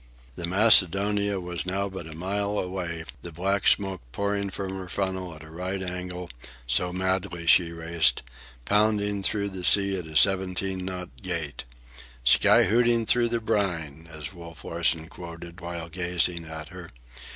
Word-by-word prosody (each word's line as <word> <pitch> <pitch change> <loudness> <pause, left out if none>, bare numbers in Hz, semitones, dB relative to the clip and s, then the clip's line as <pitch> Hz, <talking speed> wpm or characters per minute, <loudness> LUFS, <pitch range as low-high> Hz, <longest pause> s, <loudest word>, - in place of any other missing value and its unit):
The 85 +6 -5
Macedonia 100 0 +4
was 90 -1 -3
now 95 +2 -1
but 95 -4 -7
a 80 - -9
mile 100 +4 -2
away, 90 -3 -3 0.2
the 85 - -7
black 95 +4 0
smoke 95 -2 +3
pouring 100 +4 -1
from 95 0 -5
her 95 -1 -8
funnel 95 -3 -3
at 75 - -12
a 80 - -13
right 90 +3 -3
angle, 90 -1 -5 0.3
so 65 +9 +1
madly 90 -2 -2
she 85 0 +5
raced, 85 0 +1 0.4
pounding 105 -1 +2
through 100 +1 +1
the 95 -2 -7
sea 100 +2 +5
at 90 -3 -6
a 80 - -11
seventeen 95 0 +2
knot 90 -1 -5
gait—"'Sky 60 -7 +1
hooting 115 +2 +3
through 120 +1 +3
the 120 0 0
brine," 85 -8 -2
as 80 +2 -6
Wolf 85 -2 -11
Larsen 80 -1 0
quoted 85 0 -10
while 85 -1 -5
gazing 90 0 -1
at 80 -1 -7
her. - - -10
90 Hz, 150 wpm, -26 LUFS, 85-100 Hz, 0.4 s, she